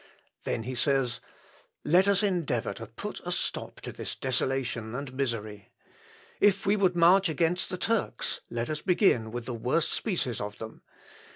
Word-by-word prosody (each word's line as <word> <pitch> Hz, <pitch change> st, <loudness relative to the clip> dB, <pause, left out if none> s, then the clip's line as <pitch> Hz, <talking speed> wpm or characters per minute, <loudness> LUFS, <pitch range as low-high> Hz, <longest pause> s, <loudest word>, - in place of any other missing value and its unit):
Then 115 Hz, -, -1 dB
he 130 Hz, +3 st, -4 dB
says, 130 Hz, -1 st, +1 dB, 0.7 s
"Let 180 Hz, +4 st, +5 dB
us 200 Hz, +1 st, +4 dB
endeavour 180 Hz, -6 st, 0 dB
to -, -, -8 dB
put -, -, -7 dB
a -, -, -3 dB
stop -, -, -3 dB
to -, -, -6 dB
this -, -, -5 dB
desolation 125 Hz, -3 st, -1 dB
and 135 Hz, -1 st, -5 dB
misery. 110 Hz, -6 st, -3 dB, 0.7 s
If 200 Hz, -1 st, +4 dB
we 200 Hz, +1 st, +4 dB
would 190 Hz, -3 st, +2 dB
march 175 Hz, +2 st, +6 dB
against 165 Hz, +3 st, +1 dB
the 185 Hz, -, -3 dB
Turks 225 Hz, +2 st, -1 dB
let 120 Hz, 0 st, -2 dB
us 155 Hz, -1 st, -3 dB
begin 180 Hz, -, +3 dB
with 120 Hz, 0 st, -5 dB
the 125 Hz, -, -4 dB
worst 125 Hz, +8 st, 0 dB
species 170 Hz, -, -1 dB
of 105 Hz, 0 st, -5 dB
them. 110 Hz, 0 st, -8 dB
140 Hz, 165 wpm, -29 LUFS, 120-185 Hz, 0.7 s, march